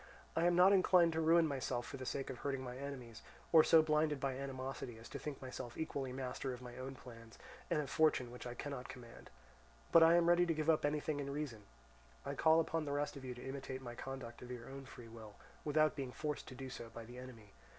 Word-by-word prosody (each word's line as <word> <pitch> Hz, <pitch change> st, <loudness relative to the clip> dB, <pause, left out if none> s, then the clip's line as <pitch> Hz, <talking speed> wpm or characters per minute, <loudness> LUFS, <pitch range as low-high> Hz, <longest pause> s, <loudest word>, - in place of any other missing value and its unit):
I 165 Hz, -, +2 dB
am 175 Hz, -, +3 dB
not 185 Hz, +3 st, +7 dB
inclined 180 Hz, -3 st, +5 dB
to 160 Hz, -, 0 dB
ruin 165 Hz, +1 st, +5 dB
myself 130 Hz, -3 st, -2 dB
for 145 Hz, -4 st, -7 dB
the 130 Hz, -1 st, -6 dB
sake 135 Hz, -1 st, -2 dB
of 125 Hz, -, -8 dB
hurting 135 Hz, -2 st, -2 dB
my 125 Hz, -1 st, -6 dB
enemies, 130 Hz, -4 st, -7 dB, 0.3 s
or 160 Hz, -2 st, +9 dB
so 160 Hz, 0 st, +7 dB
blinded 150 Hz, -1 st, +2 dB
by 135 Hz, -1 st, -1 dB
animosity 130 Hz, -3 st, -5 dB
as 115 Hz, -, -11 dB
to -, -, -6 dB
think 150 Hz, -3 st, -5 dB
myself 130 Hz, -2 st, -6 dB
equally 140 Hz, -5 st, -3 dB
master 130 Hz, 0 st, -3 dB
of -, -, -12 dB
my 125 Hz, -1 st, -9 dB
own 130 Hz, +1 st, -6 dB
plans 115 Hz, -3 st, -12 dB, 0.3 s
and -, -, +2 dB
of 145 Hz, -, -2 dB
fortune 140 Hz, -4 st, +2 dB
which 125 Hz, 0 st, -8 dB
I 120 Hz, -, -6 dB
cannot 140 Hz, -1 st, -5 dB
command; 120 Hz, -2 st, -11 dB, 0.6 s
but 165 Hz, -, +8 dB
I 165 Hz, +1 st, +8 dB
am 170 Hz, -1 st, +4 dB
ready 175 Hz, 0 st, +5 dB
to 165 Hz, -, +1 dB
give 155 Hz, +1 st, +3 dB
up 155 Hz, -, +1 dB
anything 150 Hz, 0 st, 0 dB
in 140 Hz, -1 st, -3 dB
reason. 140 Hz, -8 st, -4 dB, 0.6 s
I -, -, -2 dB
call 160 Hz, +1 st, +5 dB
upon 165 Hz, -1 st, 0 dB
the 140 Hz, -, -2 dB
rest 145 Hz, +1 st, -1 dB
of 140 Hz, -, -8 dB
you 125 Hz, -1 st, -5 dB
to 125 Hz, +2 st, -8 dB
imitate 135 Hz, -1 st, -5 dB
my 120 Hz, -1 st, -6 dB
conduct 125 Hz, -1 st, -7 dB
of 125 Hz, -, -9 dB
your 120 Hz, -2 st, -7 dB
own 135 Hz, 0 st, -8 dB
free 120 Hz, -2 st, -11 dB
will, 110 Hz, -2 st, -11 dB, 0.3 s
without 155 Hz, +1 st, +3 dB
being 135 Hz, -4 st, -4 dB
forced 150 Hz, +2 st, -4 dB
to 130 Hz, -, -8 dB
do 130 Hz, 0 st, -7 dB
so 120 Hz, -3 st, -7 dB
by 115 Hz, 0 st, -9 dB
the 120 Hz, +2 st, -10 dB
enemy. 115 Hz, -5 st, -11 dB
135 Hz, 240 wpm, -37 LUFS, 125-155 Hz, 0.6 s, or